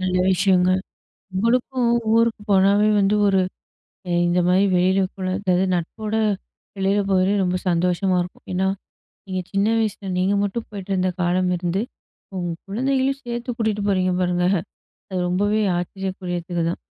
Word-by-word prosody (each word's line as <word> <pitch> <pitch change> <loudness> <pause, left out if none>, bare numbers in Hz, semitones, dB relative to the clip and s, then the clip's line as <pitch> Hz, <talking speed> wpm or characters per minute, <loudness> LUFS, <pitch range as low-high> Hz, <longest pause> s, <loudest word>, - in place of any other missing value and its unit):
நல்ல 185 0 0
விஷயங்க. 185 -1 +3 0.6
உங்களுக்க 245 +5 +1 0.3
ஊருக்கு 230 -2 +2
போனாவே 200 +2 +4
வந்து 200 +1 +3
ஒரு 195 -1 +3 0.7
எ - - 0
இந்த 175 +1 +2
மாரி 185 +2 +4
வெளியில 185 +2 +3 0.2
கூட 185 -1 -3
அதாவது 185 -2 +1
நட்போட 210 +6 -3 0.6
வெளில 195 +1 +1
போறதே 190 +1 +3
ரொம்ப 180 0 0
சந்தோஷமா 180 +2 +1
இருக்கும். 180 - -11
ஏன்னா, 190 +1 +1 0.6
நீங்க 185 -1 -3
சின்ன 200 +1 +2
வயசில 205 -3 -2
நீங்க 190 +2 +2
மட்டும் 205 +3 -3
போயிட்டிருந்த 190 -2 -1
காலம் 180 +1 +1
இருந்து, 180 +4 -1 0.5
உங்க 175 -1 -2 0.2
குழந்தைகளையும் 265 +5 0
சேர்த்து 240 0 -4
கூட்டிட்டு 210 -2 0
போறீங்க 185 -1 +1
பாருங்க! 180 0 +1 0.6
அது 185 - -2
ரொம்பவே 205 +4 +1 0.2
ஆச்சரியகூரியத்துக்குதான். 175 -2 -3
190 Hz, 130 wpm, -22 LUFS, 180-210 Hz, 0.7 s, போனாவே